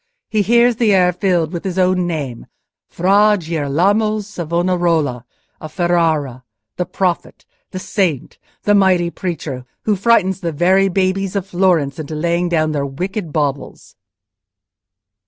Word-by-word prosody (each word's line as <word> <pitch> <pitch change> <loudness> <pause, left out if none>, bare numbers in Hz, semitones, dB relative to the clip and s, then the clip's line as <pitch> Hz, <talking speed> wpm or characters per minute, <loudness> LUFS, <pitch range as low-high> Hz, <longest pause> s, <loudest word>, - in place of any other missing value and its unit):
He 215 - +2
hears 235 +3 +3
the 220 -4 +3
air 180 -1 +3
filled 175 -2 0
with 170 - -4
his 190 -1 -4
own 185 -1 +2
name—Fra 180 - -1
Girolamo 175 +7 0
Savonarola, 170 - -1 0.3
of 155 - -9
Ferrara; 160 -8 0 0.3
the 180 - -2
prophet, 180 -3 -3 0.2
the - - -7
saint, 185 - -2 0.2
the 205 - +3
mighty 185 -4 +3
preacher, 160 -9 -5 0.2
who 215 - +1
frightens 195 -2 +2
the 170 -3 -3
very 185 +5 +3
babies 190 +1 -1
of 195 -2 -1
Florence 175 -7 +1
into 155 0 -6
laying 170 +3 0
down 155 -2 +1
their 140 -2 -2
wicked 175 +5 -5
baubles." 145 -2 -3
175 Hz, 130 wpm, -18 LUFS, 155-195 Hz, 0.3 s, hears